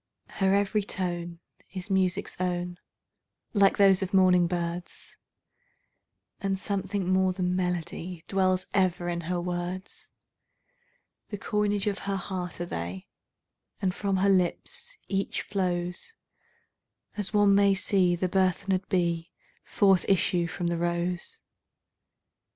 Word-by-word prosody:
Her 195 Hz, 0 st, +4 dB
every 200 Hz, +1 st, +2 dB
tone 175 Hz, -3 st, -4 dB, 0.3 s
is 190 Hz, +1 st, -5 dB
music's 190 Hz, +1 st, +1 dB
own, 180 Hz, -1 st, -2 dB, 0.7 s
like 200 Hz, -2 st, +4 dB
those 195 Hz, -2 st, +5 dB
of 190 Hz, +1 st, -1 dB
morning 180 Hz, -2 st, +5 dB
birds, 175 Hz, 0 st, -3 dB, 1.2 s
And 195 Hz, -1 st, -1 dB
something 195 Hz, -1 st, -2 dB
more 185 Hz, 0 st, +3 dB
than 180 Hz, -1 st, -1 dB
melody 180 Hz, -1 st, -3 dB
dwells 185 Hz, -1 st, +1 dB
ever 180 Hz, -2 st, +1 dB
in 170 Hz, 0 st, -2 dB
her 180 Hz, -1 st, 0 dB
words; 175 Hz, +2 st, -5 dB, 1.2 s
The 205 Hz, -, -4 dB
coinage 205 Hz, 0 st, 0 dB
of 205 Hz, -1 st, -1 dB
her 200 Hz, 0 st, -2 dB
heart 180 Hz, -2 st, -4 dB
are 175 Hz, -, -2 dB
they, 90 Hz, -, -5 dB, 0.7 s
and 185 Hz, -2 st, 0 dB
from 200 Hz, -1 st, -1 dB
her 195 Hz, +2 st, +3 dB
lips 190 Hz, -, 0 dB
each 195 Hz, 0 st, -2 dB
flowsAs 180 Hz, -, -2 dB, 1.2 s
one 205 Hz, -2 st, +5 dB
may 200 Hz, 0 st, +5 dB
see 185 Hz, -2 st, +3 dB
the 185 Hz, +2 st, -1 dB
burthened 185 Hz, +1 st, +1 dB
bee 170 Hz, -3 st, 0 dB, 0.3 s
forth 195 Hz, -3 st, +3 dB
issue 180 Hz, -2 st, +2 dB
from 175 Hz, +1 st, -4 dB
the 170 Hz, 0 st, 0 dB
rose. 175 Hz, -, -1 dB
185 Hz, 120 wpm, -28 LUFS, 175-195 Hz, 1.2 s, those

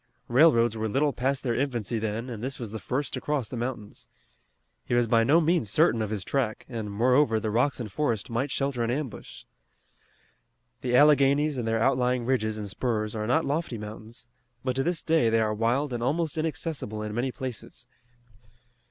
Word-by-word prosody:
Railroads 120 Hz, -4 st, +5 dB
were 110 Hz, 0 st, -2 dB
little 140 Hz, +5 st, +1 dB
past 130 Hz, +2 st, -1 dB
their 120 Hz, -3 st, 0 dB
infancy 120 Hz, -3 st, -1 dB
then 110 Hz, +2 st, -3 dB
and 115 Hz, -3 st, -6 dB
this 130 Hz, +1 st, -3 dB
was 115 Hz, -4 st, -6 dB
the 110 Hz, -, -5 dB
first 135 Hz, +6 st, -3 dB
to -, -, -3 dB
cross 145 Hz, -6 st, -1 dB
the 125 Hz, -, -7 dB
mountains. 115 Hz, -3 st, -5 dB, 0.8 s
He 120 Hz, -, -1 dB
was 120 Hz, 0 st, +3 dB
by 115 Hz, 0 st, +3 dB
no 150 Hz, +8 st, +5 dB
means 165 Hz, -, +1 dB
certain 115 Hz, +3 st, +3 dB
of 110 Hz, -, -2 dB
his 105 Hz, -3 st, -3 dB
track, 120 Hz, -1 st, -2 dB
and, 110 Hz, -5 st, -5 dB
moreover, 120 Hz, +2 st, +3 dB
the 110 Hz, -1 st, -2 dB
rocks 125 Hz, +6 st, +1 dB
and 110 Hz, -4 st, -5 dB
forest 115 Hz, -3 st, -1 dB
might 120 Hz, +5 st, -2 dB
shelter 135 Hz, -2 st, -1 dB
an 115 Hz, -, 0 dB
ambush. 135 Hz, 0 st, -5 dB, 1.4 s
The 125 Hz, -1 st, 0 dB
Alleghanies 145 Hz, +1 st, +5 dB
and 120 Hz, -3 st, -3 dB
their 115 Hz, 0 st, +1 dB
outlying 125 Hz, 0 st, +1 dB
ridges 110 Hz, -4 st, 0 dB
and 105 Hz, -1 st, -5 dB
spurs 110 Hz, 0 st, -2 dB
are 110 Hz, -1 st, -3 dB
not 160 Hz, +7 st, +2 dB
lofty 145 Hz, -4 st, -2 dB
mountains, 110 Hz, +3 st, -9 dB, 0.4 s
but 130 Hz, -1 st, -1 dB
to -, -, +2 dB
this 170 Hz, +4 st, -1 dB
day 160 Hz, -8 st, +3 dB
they 115 Hz, 0 st, +2 dB
are 110 Hz, -1 st, +1 dB
wild 120 Hz, +6 st, 0 dB
and 120 Hz, -, -3 dB
almost 155 Hz, +6 st, 0 dB
inaccessible 155 Hz, -8 st, -3 dB
in 105 Hz, 0 st, -5 dB
many 125 Hz, +4 st, -1 dB
places. 120 Hz, -2 st, -7 dB
120 Hz, 190 wpm, -27 LUFS, 110-140 Hz, 1.4 s, Railroads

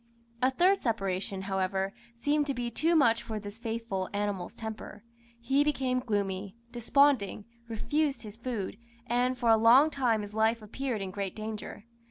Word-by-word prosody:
A 255 Hz, -, +5 dB
third 365 Hz, +9 st, +3 dB
separation, 195 Hz, -4 st, -2 dB
however, 190 Hz, 0 st, -1 dB, 0.2 s
seemed 290 Hz, +4 st, +1 dB
to 275 Hz, -, -1 dB
be 240 Hz, -1 st, -3 dB
too 330 Hz, +8 st, +2 dB
much 235 Hz, -7 st, +4 dB
for 220 Hz, -2 st, -5 dB
this 205 Hz, +1 st, -9 dB
faithful 225 Hz, -5 st, -3 dB
animal's 205 Hz, -3 st, -2 dB
temper. 220 Hz, -2 st, -7 dB, 0.4 s
He 270 Hz, +4 st, +2 dB
became 265 Hz, -4 st, 0 dB
gloomy, 200 Hz, -4 st, -2 dB, 0.2 s
desponding, 240 Hz, -4 st, +2 dB, 0.2 s
refused 280 Hz, +6 st, -1 dB
his 210 Hz, -1 st, -8 dB
food, 230 Hz, -4 st, -4 dB, 0.3 s
and 250 Hz, +1 st, +1 dB
for 240 Hz, -2 st, +3 dB
a 225 Hz, -, +7 dB
long 250 Hz, +8 st, +6 dB
time 240 Hz, -7 st, +1 dB
his 205 Hz, 0 st, -8 dB
life 220 Hz, +1 st, +2 dB
appeared 230 Hz, 0 st, -3 dB
in 190 Hz, -, -5 dB
great 195 Hz, -1 st, -4 dB
danger. 215 Hz, -1 st, -6 dB
225 Hz, 160 wpm, -30 LUFS, 205-255 Hz, 0.4 s, a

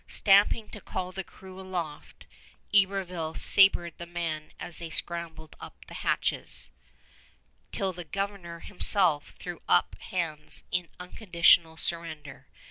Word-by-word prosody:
Stamping 205 Hz, +2 st, +4 dB
to 215 Hz, -, -10 dB
call 185 Hz, 0 st, -4 dB
the 190 Hz, +1 st, -5 dB
crew 190 Hz, +1 st, -13 dB
aloft, 175 Hz, -5 st, -6 dB, 0.5 s
Iberville 185 Hz, -5 st, +2 dB
sabered 185 Hz, -4 st, +4 dB
the 170 Hz, -, -7 dB
men 165 Hz, -3 st, -4 dB
as 175 Hz, -, -3 dB
they 170 Hz, -1 st, -6 dB
scrambled 160 Hz, -1 st, -3 dB
up -, -, -11 dB
the -, -, -12 dB
hatches, -, -, -1 dB, 1.0 s
till 195 Hz, -3 st, -1 dB
the 175 Hz, 0 st, -7 dB
Governor 185 Hz, -1 st, -5 dB
himself 180 Hz, -6 st, +2 dB
threw 175 Hz, -1 st, -7 dB
up -, -, +4 dB
hands 160 Hz, -4 st, -2 dB
in 175 Hz, -2 st, -1 dB
unconditional 170 Hz, -3 st, +3 dB
surrender. 160 Hz, -5 st, -6 dB
175 Hz, 125 wpm, -28 LUFS, 165-190 Hz, 1.0 s, Stamping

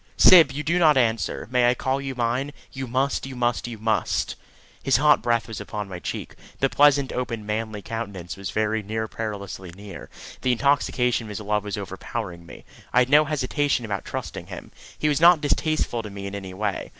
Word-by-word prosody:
"Syb, 165 Hz, -6 st, +8 dB
you 145 Hz, +2 st, -4 dB
do 170 Hz, +4 st, +1 dB
not 155 Hz, -4 st, +5 dB
answer. 115 Hz, -3 st, 0 dB
May 125 Hz, -1 st, +4 dB
I 125 Hz, -, +2 dB
call 135 Hz, +2 st, -1 dB
you 135 Hz, -1 st, -5 dB
mine? 125 Hz, +4 st, -1 dB, 0.2 s
You 130 Hz, -1 st, -5 dB
must, 130 Hz, +2 st, 0 dB
you 135 Hz, -, -8 dB
must, 120 Hz, 0 st, 0 dB
you 115 Hz, -2 st, -6 dB
must!" 110 Hz, -3 st, 0 dB, 0.5 s
His 135 Hz, -, +3 dB
hot 150 Hz, +2 st, +5 dB
breath 115 Hz, 0 st, +1 dB
was 110 Hz, -2 st, -6 dB
upon 105 Hz, 0 st, -5 dB
my 90 Hz, -1 st, -6 dB
cheek. -, -, -5 dB, 0.3 s
The 135 Hz, -, +1 dB
pleasant, 145 Hz, -2 st, +4 dB
open, 115 Hz, -4 st, -3 dB
manly 105 Hz, -1 st, -3 dB
countenance 100 Hz, -6 st, -5 dB
was 100 Hz, -1 st, -6 dB
very 110 Hz, 0 st, 0 dB
near 110 Hz, +2 st, -3 dB
perilously 100 Hz, -4 st, -6 dB
near. 100 Hz, 0 st, -10 dB, 0.3 s
The 125 Hz, -, +2 dB
intoxication 125 Hz, -2 st, +1 dB
of -, -, -9 dB
his 105 Hz, -, -5 dB
love 105 Hz, -1 st, -1 dB
was 105 Hz, -1 st, -4 dB
overpowering 95 Hz, -2 st, -6 dB
me. -, -, -12 dB, 0.3 s
I -, -, 0 dB
had 125 Hz, 0 st, +4 dB
no 150 Hz, +2 st, +6 dB
hesitation 145 Hz, -3 st, 0 dB
about 100 Hz, -4 st, -3 dB
trusting -, -, -6 dB
him. -, -, -9 dB, 0.3 s
He 150 Hz, -, 0 dB
was 150 Hz, 0 st, +1 dB
not 170 Hz, -1 st, +8 dB
distasteful 150 Hz, -4 st, 0 dB
to 105 Hz, -, -8 dB
me 100 Hz, 0 st, -7 dB
in 100 Hz, -, -5 dB
any 95 Hz, -2 st, -7 dB
way. 105 Hz, 0 st, -2 dB
115 Hz, 200 wpm, -24 LUFS, 105-135 Hz, 0.5 s, Syb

